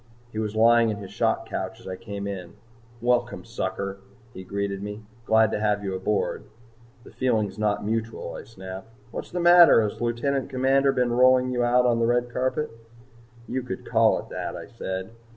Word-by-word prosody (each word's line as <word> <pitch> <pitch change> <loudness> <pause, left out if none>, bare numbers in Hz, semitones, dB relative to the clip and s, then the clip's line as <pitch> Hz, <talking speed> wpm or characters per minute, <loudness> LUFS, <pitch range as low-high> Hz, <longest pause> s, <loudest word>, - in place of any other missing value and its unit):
He 110 - -4
was 110 -1 -3
lying 115 +1 +5
in 105 - -2
his 100 -2 -9
shock - - 0
couch - - -4
as - - -13
I 95 - -4
came 100 -1 -6
in. 95 -4 -6 0.5
"Welcome, 120 0 0
sucker," 100 -3 -4 0.3
he 95 - -8
greeted 100 0 -3
me. 105 +1 -6 0.2
"Glad 110 -1 +4
to - - -1
have 105 -1 +1
you 95 -1 -2
aboard." 100 +2 -1 0.6
"The - - -14
feeling's 110 -6 0
not 105 -1 0
mutual," 115 +1 -3
I - - -7
snapped. 95 -1 -9 0.2
"What's - - -6
the 180 - -3
matter? 175 -4 +8
Has 105 - -3
the 120 - -1
Lieutenant 130 +4 -1
Commander 135 +1 +3
been 125 -2 +1
rolling 130 +1 +4
you 125 -1 0
out 125 +1 +3
on 120 -1 +3
the 115 - +2
red 120 0 +1
carpet?" 130 +4 -1 0.8
"You 130 - -2
could 120 -6 -6
call - - +3
it - - -8
that," - - -4
I - - -7
said. 95 +2 -5
115 Hz, 190 wpm, -25 LUFS, 100-125 Hz, 0.8 s, matter